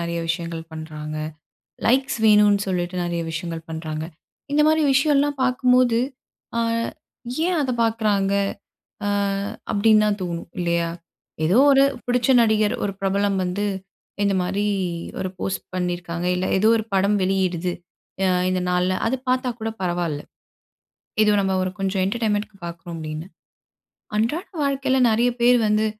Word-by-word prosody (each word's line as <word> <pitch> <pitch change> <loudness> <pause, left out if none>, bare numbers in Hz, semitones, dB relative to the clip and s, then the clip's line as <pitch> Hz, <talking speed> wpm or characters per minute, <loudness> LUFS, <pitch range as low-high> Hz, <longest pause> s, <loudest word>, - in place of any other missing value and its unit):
நெறைய 170 0 -2
விஷயங்கள் 165 -1 -3
பண்றாங்க. 155 -1 -6 0.7
லைக்ஸ் 260 +1 +2
வேணுன்னு 210 -1 +5
சொல்லிட்டு, 180 -1 -2
நெறைய 170 -1 -2
விஷயங்கள் 165 0 -4
பண்றாங்க. 160 -1 -4 0.5
இந்த 300 - +4
மாரி 315 0 +3
விஷயம்லாம் 285 +1 +2
பாக்கும்போது, 250 -2 +3 0.6
அ - - +2 0.9
ஏன் 360 -2 +1
அத 265 -3 0
பாக்குறாங்க? 210 -3 +1 0.7
அ - - +1 0.6
அப்டின்னு 215 +1 +4
தான் 210 -1 0
தோணும் 170 -1 -5
இல்லையா, 170 -1 +1 0.6
ஏதோ 185 +9 +4
ஒரு 270 0 +6 0.2
புடிச்ச 245 +1 +1
நடிகர், 215 -1 +2
ஒரு 200 - -1
பிரபலம் 195 0 +1
வந்து, 200 +3 -1 0.6
இந்த 200 -1 +2
மாரி 200 +3 -1 0.5
ஒரு 185 - -1
போஸ்ட் 190 - -2
பண்ணியிருக்காங்க, 175 -1 -2
இல்ல 185 +1 -1
ஏதோ 215 +3 +4
ஒரு 220 - -4
படம் 200 +2 +3
வெளியிடுது. 185 -2 0 0.5
அ - - +3 0.2
இந்த 185 0 0
நாள்ல 180 +1 +2 0.2
அது 260 - 0
பாத்தா 255 0 +1
கூட 225 - -2
பரவால்ல. 175 -4 -1 1.0
இது 210 - +3
ஒரு 205 - +3
நம்ம 185 -1 0
கொஞ்சம் 195 0 0
என்டர்டெயின்மெண்ட்‌க்கு 210 -1 -1
பாக்குறோம் 170 0 -7
அப்டின்னு, 155 +1 -5 0.9
அன்றாட 235 - 0 0.2
வாழ்க்கையில 270 -1 +1
நெறைய 235 +3 +3
பேர் 245 +1 +6
வந்து, 215 +1 +2
195 Hz, 135 wpm, -23 LUFS, 175-225 Hz, 1.0 s, ஒரு